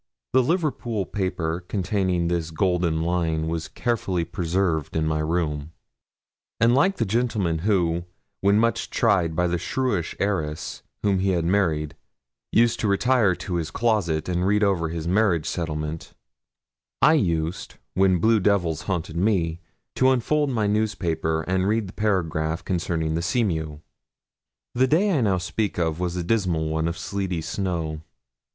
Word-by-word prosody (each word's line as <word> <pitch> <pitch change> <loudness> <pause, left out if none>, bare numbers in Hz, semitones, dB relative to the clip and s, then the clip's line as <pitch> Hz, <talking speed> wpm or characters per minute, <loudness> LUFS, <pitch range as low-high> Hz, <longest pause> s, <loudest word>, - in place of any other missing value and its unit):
The 130 - +6
Liverpool 125 - -1
paper 90 -3 -2
containing 95 -3 0
this 85 -2 -1
golden 85 -1 0
line 80 -2 0
was 80 -1 -3
carefully 95 -2 -1
preserved 85 -3 -1
in 80 -1 +1
my 75 0 0
room; 75 -1 -2 0.9
and 115 +1 +4
like 185 +9 +3
the 115 - +1
gentleman 105 -6 0
who, 85 -3 +1 0.3
when 100 +1 +3
much 115 +1 +1
tried 90 -8 +2
by 90 - +2
the 90 0 0
shrewish 115 -10 -1
heiress 80 -7 -2 0.2
whom 100 -2 +2
he 95 +1 +1
had 85 -2 0
married, 80 -5 +1 0.6
used 115 0 +3
to 110 - 0
retire 105 -1 +3
to 90 0 -4
his 80 -1 -2
closet 100 -10 0
and 90 +1 0
read 105 +1 +3
over 90 -5 +1
his 80 0 -4
marriage 90 -4 +2
settlement, 80 -2 -4 0.9
I 155 - +7
used, 85 - -1 0.2
when 95 -1 +3
blue 110 +5 +3
devils 90 -6 +1
haunted 85 -3 -2
me, 85 -4 +1 0.4
to 130 - +5
unfold 145 +4 +1
my 115 -5 0
newspaper 85 -7 0
and 95 +2 0
read 110 +1 +1
the 95 - -10
paragraph 80 -6 -1
concerning 80 -3 -1
the 80 - -1
Seamew. 80 -7 -1 0.9
The 130 +2 +3
day 185 +7 +3
I 135 - +2
now 100 -5 +2
speak 100 +3 -2
of 80 -2 0
was 90 -1 -2
a 90 - -2
dismal 85 -6 0
one 80 +1 0
of 85 0 -3
sleety 95 -2 -3
snow. 80 -3 -3
90 Hz, 150 wpm, -24 LUFS, 80-105 Hz, 0.9 s, I